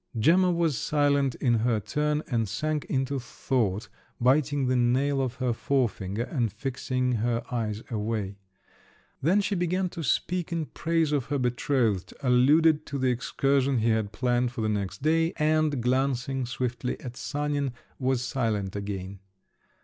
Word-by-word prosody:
Gemma 180 Hz, +10 st, +4 dB
was 165 Hz, -7 st, +1 dB
silent 140 Hz, -3 st, +2 dB
in 120 Hz, -4 st, +2 dB
her 115 Hz, -1 st, +1 dB
turn, 150 Hz, +7 st, -1 dB
and 115 Hz, -5 st, 0 dB
sank 150 Hz, +8 st, -2 dB
into 135 Hz, +1 st, -1 dB
thought, 115 Hz, -5 st, -1 dB, 0.3 s
biting 140 Hz, +2 st, +2 dB
the 130 Hz, 0 st, +1 dB
nail 130 Hz, +3 st, +2 dB
of 130 Hz, -2 st, -2 dB
her 125 Hz, -1 st, 0 dB
forefinger 115 Hz, -5 st, -1 dB
and 120 Hz, -5 st, -1 dB
fixing 130 Hz, +1 st, -2 dB
her 115 Hz, +1 st, 0 dB
eyes 110 Hz, -3 st, -2 dB
away. 105 Hz, -3 st, -2 dB, 0.8 s
Then 185 Hz, +8 st, +3 dB
she 205 Hz, -, -1 dB
began 180 Hz, 0 st, 0 dB
to 170 Hz, -, -7 dB
speak 175 Hz, +6 st, 0 dB
in 165 Hz, -2 st, -1 dB
praise 165 Hz, 0 st, 0 dB
of 140 Hz, -5 st, 0 dB
her 145 Hz, -, -1 dB
betrothed, 120 Hz, -5 st, 0 dB
alluded 150 Hz, +5 st, +4 dB
to 140 Hz, -, -3 dB
the 130 Hz, -1 st, +2 dB
excursion 135 Hz, +2 st, +1 dB
he 115 Hz, 0 st, +2 dB
had 110 Hz, -2 st, +1 dB
planned 120 Hz, +2 st, +1 dB
for 125 Hz, -2 st, -5 dB
the 110 Hz, -, 0 dB
next 100 Hz, 0 st, -3 dB
day, 165 Hz, +2 st, +2 dB
and, 155 Hz, -4 st, +1 dB
glancing 130 Hz, 0 st, 0 dB
swiftly 125 Hz, -1 st, -3 dB
at 125 Hz, -2 st, -7 dB
Sanin, 145 Hz, -1 st, -2 dB, 0.3 s
was 130 Hz, -1 st, +1 dB
silent 110 Hz, -7 st, -1 dB
again. 100 Hz, -1 st, -5 dB
130 Hz, 150 wpm, -27 LUFS, 115-145 Hz, 0.8 s, Gemma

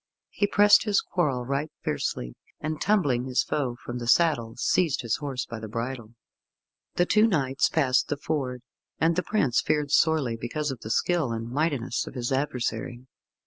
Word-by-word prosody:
He 205 Hz, -, 0 dB
pressed 205 Hz, 0 st, +6 dB
his 205 Hz, -2 st, +3 dB
quarrel 135 Hz, -9 st, -1 dB
right 140 Hz, +4 st, -2 dB
fiercely, -, -, -2 dB, 0.3 s
and 155 Hz, 0 st, -4 dB
tumbling 145 Hz, -, +2 dB
his 130 Hz, -1 st, +1 dB
foe 130 Hz, -5 st, -2 dB
from 120 Hz, 0 st, -4 dB
the 120 Hz, -, -5 dB
saddle, 120 Hz, -5 st, +3 dB
seized 155 Hz, +3 st, +1 dB
his 115 Hz, -2 st, 0 dB
horse 135 Hz, -3 st, -4 dB
by 115 Hz, -, -7 dB
the 110 Hz, -, -7 dB
bridle. 115 Hz, 0 st, -5 dB, 0.8 s
The 175 Hz, -, +3 dB
two 215 Hz, +4 st, +4 dB
knights 135 Hz, -, +1 dB
passed 135 Hz, -5 st, +2 dB
the 145 Hz, -, -2 dB
ford, 130 Hz, -5 st, -3 dB, 0.3 s
and 165 Hz, +2 st, +2 dB
the 180 Hz, -, +1 dB
prince 160 Hz, -, +1 dB
feared 150 Hz, -2 st, 0 dB
sorely 150 Hz, -8 st, +3 dB
because 135 Hz, +6 st, -3 dB
of 130 Hz, -, -7 dB
the 110 Hz, -, -8 dB
skill 160 Hz, +2 st, +1 dB
and 115 Hz, +1 st, -4 dB
mightiness 140 Hz, -4 st, -1 dB
of -, -, -9 dB
his 120 Hz, 0 st, -3 dB
adversary. 125 Hz, -3 st, -2 dB
135 Hz, 175 wpm, -26 LUFS, 120-160 Hz, 0.8 s, pressed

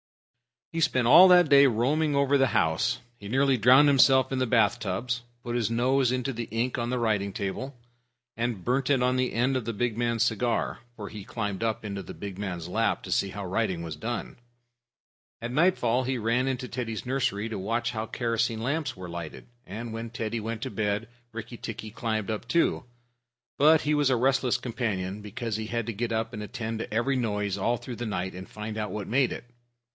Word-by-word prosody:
He 165 Hz, -, -3 dB
spent 130 Hz, -6 st, +2 dB
all 175 Hz, +10 st, +9 dB
that 180 Hz, -3 st, +6 dB
day 140 Hz, 0 st, +8 dB
roaming 140 Hz, +6 st, +1 dB
over 140 Hz, 0 st, +3 dB
the 135 Hz, -1 st, +4 dB
house. 80 Hz, 0 st, +1 dB, 0.2 s
He 100 Hz, -, -9 dB
nearly 135 Hz, +3 st, +2 dB
drowned 130 Hz, +6 st, +6 dB
himself 130 Hz, -1 st, +5 dB
in 135 Hz, -, -1 dB
the 130 Hz, -, +1 dB
bath 115 Hz, 0 st, +3 dB
tubs, 120 Hz, +5 st, -2 dB, 0.2 s
put 120 Hz, -, -4 dB
his 115 Hz, -3 st, +1 dB
nose 125 Hz, +2 st, +2 dB
into 130 Hz, +1 st, -1 dB
the 115 Hz, 0 st, -4 dB
ink 115 Hz, +4 st, -1 dB
on 120 Hz, 0 st, -2 dB
a 125 Hz, -, 0 dB
writing 105 Hz, -4 st, 0 dB
table, 120 Hz, +7 st, -4 dB, 0.6 s
and 115 Hz, -5 st, -2 dB
burned 130 Hz, +2 st, 0 dB
it 135 Hz, -3 st, +3 dB
on 125 Hz, 0 st, +2 dB
the 130 Hz, 0 st, 0 dB
end 125 Hz, +4 st, +1 dB
of 125 Hz, -, -4 dB
the 115 Hz, -, -2 dB
big 115 Hz, +1 st, -1 dB
man's 115 Hz, -1 st, +1 dB
cigar, 120 Hz, 0 st, 0 dB, 0.2 s
for 105 Hz, -3 st, -7 dB
he 105 Hz, -2 st, -8 dB
climbed 105 Hz, -5 st, -3 dB
up 115 Hz, -1 st, -1 dB
in 100 Hz, -, -4 dB
the 100 Hz, -2 st, -6 dB
big 100 Hz, -2 st, -7 dB
man's 90 Hz, -5 st, -4 dB
lap 115 Hz, +5 st, 0 dB
to -, -, -7 dB
see 100 Hz, -, +1 dB
how 100 Hz, 0 st, -6 dB
writing 95 Hz, -3 st, -1 dB
was 80 Hz, -3 st, -6 dB
done. 120 Hz, +9 st, -4 dB, 1.0 s
At 120 Hz, +1 st, -4 dB
nightfall 130 Hz, -5 st, +2 dB
he 130 Hz, 0 st, -1 dB
ran 120 Hz, +3 st, +1 dB
into 125 Hz, -1 st, -2 dB
Teddy's 115 Hz, -3 st, -4 dB
nursery 125 Hz, -5 st, -1 dB
to 110 Hz, -3 st, -4 dB
watch 115 Hz, +5 st, -1 dB
how 110 Hz, -1 st, -4 dB
kerosene 115 Hz, -1 st, -1 dB
lamps 140 Hz, 0 st, -1 dB
were 90 Hz, -1 st, -7 dB
lighted, 85 Hz, -2 st, -7 dB, 0.2 s
and 110 Hz, +3 st, -6 dB
when 115 Hz, +1 st, -5 dB
Teddy 115 Hz, 0 st, -3 dB
went 110 Hz, +1 st, -4 dB
to 130 Hz, -, -4 dB
bed 105 Hz, +1 st, -1 dB, 0.2 s
Rikki 115 Hz, +1 st, -7 dB
tikki 110 Hz, -1 st, -7 dB
climbed 110 Hz, -2 st, -2 dB
up 110 Hz, +2 st, -4 dB
too. 170 Hz, -1 st, +1 dB, 0.7 s
But 155 Hz, +2 st, +6 dB
he 150 Hz, -, 0 dB
was 145 Hz, -2 st, +3 dB
a 130 Hz, -, +3 dB
restless 130 Hz, 0 st, +2 dB
companion, 105 Hz, -5 st, -3 dB
because 110 Hz, +1 st, -4 dB
he 110 Hz, 0 st, -4 dB
had 115 Hz, 0 st, -2 dB
to 115 Hz, -, -2 dB
get 115 Hz, +2 st, -2 dB
up 115 Hz, +1 st, -2 dB
and 110 Hz, -, -5 dB
attend 110 Hz, 0 st, -4 dB
to -, -, -5 dB
every 120 Hz, +5 st, +1 dB
noise 105 Hz, -5 st, -1 dB
all 120 Hz, +5 st, +1 dB
through 120 Hz, -1 st, -8 dB
the 120 Hz, -, -4 dB
night, 95 Hz, -3 st, -3 dB
and 95 Hz, +1 st, -9 dB
find 110 Hz, 0 st, -6 dB
out 105 Hz, -1 st, -2 dB
what 105 Hz, -2 st, -4 dB
made 130 Hz, +1 st, +2 dB
it. -, -, -7 dB
115 Hz, 210 wpm, -27 LUFS, 105-130 Hz, 1.0 s, all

